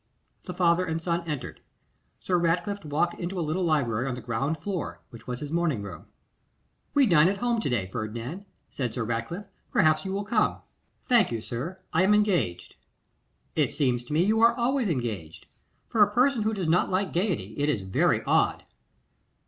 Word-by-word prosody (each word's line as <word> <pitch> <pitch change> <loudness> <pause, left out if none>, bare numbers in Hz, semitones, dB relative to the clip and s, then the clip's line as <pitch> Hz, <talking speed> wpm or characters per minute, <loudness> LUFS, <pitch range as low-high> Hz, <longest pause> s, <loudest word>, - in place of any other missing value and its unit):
The - - -5
father 175 0 +3
and 165 -2 -2
son 170 +1 -1
entered. 145 -4 -5 0.6
Sir 180 -2 +1
Ratcliffe 180 +4 0
walked 155 +3 -1
into 180 +1 -3
a 165 - -1
little 165 +5 -1
library 135 -7 +1
on 130 - -2
the 125 - -7
ground 135 +7 -1
floor, 180 +1 -4
which 115 - -13
was 125 0 -4
his 145 0 -5
morning 160 -10 0
room. 90 -6 -9 0.9
'We 285 -2 +6
dine 170 -6 +5
at 195 +1 0
home 235 +1 0
to - - -1
day, 115 -7 0
Ferdinand,' 115 - -5 0.3
said 125 -5 -3
Sir 125 - -1
Ratcliffe. 115 - -3 0.3
'Perhaps 155 -9 +3
you 190 - -4
will 200 +1 -2
come.' 215 +1 +1 0.5
'Thank 235 - +4
you, 115 - -2
sir, 140 +12 -6
I 165 - +3
am 200 +3 +5
engaged.' 185 - 0 0.8
'It - - +2
seems 130 -4 0
to 135 - -6
me 160 +3 +4
you 220 +2 +2
are 230 0 +5
always 245 -2 +1
engaged. 110 - -4 0.4
For 220 - +1
a 205 0 +6
person 250 +2 +3
who 215 +1 0
does 185 -4 -2
not 170 +3 +3
like 190 +1 0
gaiety, 185 +1 -1
it 145 +1 +1
is 115 -9 0
very 95 0 +1
odd. - - +2
170 Hz, 190 wpm, -27 LUFS, 125-200 Hz, 0.9 s, We